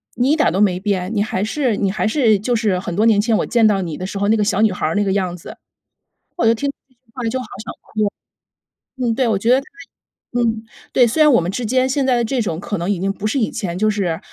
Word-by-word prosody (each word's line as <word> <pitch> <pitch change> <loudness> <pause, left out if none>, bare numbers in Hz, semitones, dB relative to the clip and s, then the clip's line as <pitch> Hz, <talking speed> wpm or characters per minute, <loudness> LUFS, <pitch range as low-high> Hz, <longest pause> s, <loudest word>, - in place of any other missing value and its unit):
你 250 +4 +2
一 310 - +4
点 310 - +2
儿 - - -3
都 190 +4 0
没 185 -3 +2
变， 190 -1 -1
你 205 - +2
还 205 -2 -1
是 245 +1 0
你 195 -2 0
还 215 - -1
是 220 -4 +3
就 240 +4 0
是 210 -5 +1
很 175 -2 -5
多 210 +4 +2
年 220 -3 +4
前 225 0 +1
我 - - 0
见 235 -2 +3
到 200 -2 +2
你 165 -4 -4
的 185 - -5
时 195 - -6
候， 200 +1 0
那 220 - +4
个 210 - +1
小 205 0 +1
女 220 -3 +4
孩 180 - -2
儿 160 - -2
那 205 - +2
个 195 - 0
样 185 -3 -1
子。 - - -11 0.8
“我 340 - +1
就 230 - +5
听 280 +5 -2
到 - - -11
这 255 - -32
句 240 - -49
话 250 - -5
就 255 +3 -2
好 255 - -7 0.2
想 - - -6 1.1
哭 255 -2 -7
嗯， - - +1
对， 255 0 +1
我 220 -4 +1
觉 225 +4 -1
得 260 - +5
他 - - -17 0.7
嗯， 225 -2 0 0.3
对， 250 - +5
虽 285 +8 0
然 300 - +6
我 240 - +5
们 170 +2 -2
之 245 +5 -4
间 255 +3 +2
现 275 +1 0
在 260 -1 +3
的 240 - +1
这 250 +2 -1
种 170 -6 -3
可 205 +1 -4
能 175 +3 -2
已 190 - -1
经 195 +1 -1
不 205 +1 -4
是 220 - -1
以 220 - 0
前， 175 -4 -4
就 215 +3 +1
是 190 -6 -1
215 Hz, 320 characters per minute, -19 LUFS, 195-245 Hz, 1.1 s, 然